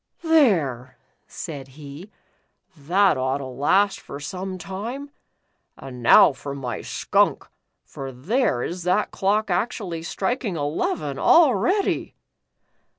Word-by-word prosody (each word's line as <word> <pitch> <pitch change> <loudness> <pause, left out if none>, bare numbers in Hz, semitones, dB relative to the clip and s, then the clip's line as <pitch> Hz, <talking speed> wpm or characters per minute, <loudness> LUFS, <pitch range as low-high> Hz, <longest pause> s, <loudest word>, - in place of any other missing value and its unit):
"There," 165 - +2 0.3
said 140 -5 -7
he, 150 +6 -10 0.7
"that 175 +2 +2
ought 130 +1 0
to 140 - -7
last 165 +11 +1
for 140 - -9
some 185 +5 -5
time. 230 +10 -6 0.7
And 130 -2 -9
now 120 - +7
for 140 +1 -7
my 125 -4 -5
skunk, - - 0 0.4
for 135 -1 -8
there 135 - 0
is 175 +2 -5
that 180 +4 0
clock 205 +1 0
actually 180 -3 -2
striking 200 +4 -2
eleven 145 -1 -2
already." 320 - +3
175 Hz, 110 wpm, -23 LUFS, 140-205 Hz, 0.7 s, now